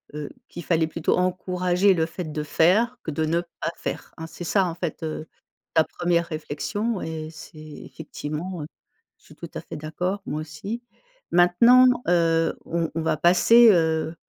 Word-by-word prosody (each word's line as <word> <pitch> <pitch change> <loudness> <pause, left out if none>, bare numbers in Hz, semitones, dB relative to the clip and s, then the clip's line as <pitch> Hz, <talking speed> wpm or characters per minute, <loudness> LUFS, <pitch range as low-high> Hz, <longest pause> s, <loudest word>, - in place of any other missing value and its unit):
heu, 150 -1 -5 0.2
qu'il 175 - -8
fallait 165 -2 +2
plutôt 160 0 0
encourager 180 +1 +1
le 165 -3 +1
fait 170 +2 -6
de 150 0 -3
faire, 190 +11 +2
que - - -4
de 155 +2 -1
ne 165 +2 +1 0.2
pas - - -1
faire, - - -6
hein, 160 - -7
hein? - - -9
C'est 170 - -9
ça 195 +3 +2
en 165 - -4
fait, 170 -2 -4
heu, 155 0 -5 0.5
ta 160 - +5
1re 170 +1 0
réflexion 180 +7 -3
et 160 -1 -5
c'est 160 - -13
effectivement, 155 +2 -7
heu, - - -7 0.5
je - - -32
suis - - -16
tout - - -9
à - - -4
fait - - -9
d'accord, 180 +6 -3
moi 150 - -3
aussi. 160 +10 -6 0.5
Maintenant, 205 +9 +6 0.2
heu, 165 -2 +2
on 165 -1 -1
on 165 - -1
va 160 - +1
passer, 220 +9 +6
heu, 160 -2 +1
170 Hz, 180 wpm, -24 LUFS, 160-180 Hz, 0.5 s, Maintenant